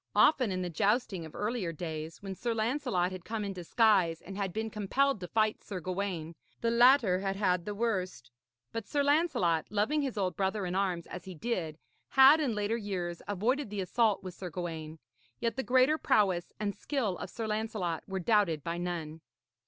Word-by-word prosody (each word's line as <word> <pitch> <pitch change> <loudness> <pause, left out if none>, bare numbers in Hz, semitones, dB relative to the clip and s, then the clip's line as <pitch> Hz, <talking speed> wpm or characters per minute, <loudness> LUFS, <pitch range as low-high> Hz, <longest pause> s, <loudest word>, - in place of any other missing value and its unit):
Often 255 -8 +5
in 185 0 -2
the 180 - -3
jousting 200 - 0
of 160 - -15
earlier 210 -5 -2
days, 160 +1 -6
when 195 -1 -4
Sir 235 +4 -2
Lancelot 225 -6 0
had 185 -2 -7
come 220 0 -3
in 200 - -3
disguise 185 -2 +2
and 195 - -9
had 195 -2 -2
been 220 +3 -3
compelled 255 +5 +1
to 180 - -6
fight 215 +2 +1
Sir 195 -3 -5
Gawaine, 180 -2 -3 0.3
the 230 - +1
latter 235 -5 +5
had 195 0 -2
had 180 -3 +1
the 210 - -4
worst. 185 - -2 0.4
But 225 -3 -5
Sir 285 -1 +1
Lancelot, 285 - +2
loving 215 +9 +1
his 265 -5 -3
old 185 -2 0
brother 195 +1 -1
in 180 - -3
arms 185 -3 0
as 180 - -8
he 185 -1 -8
did, 165 -5 -3 0.3
had 270 +3 +8
in 255 -7 0
later 210 +2 0
years 180 -5 -4
avoided 225 +7 0
the 205 -1 -3
assault 210 +1 +1
with 185 -1 -6
Sir 180 0 -7
Gawaine; 160 -2 -5 0.4
yet 230 - -1
the 265 - -1
greater 260 +4 +3
prowess 185 -5 +2
and 205 -1 -1
skill 245 -10 -1
of - - -5
Sir 230 - -5
Lancelot 210 -6 -2
were 190 0 -3
doubted 180 -6 +2
by 170 +1 -3
none. 165 -3 -4
200 Hz, 190 wpm, -31 LUFS, 180-230 Hz, 0.4 s, had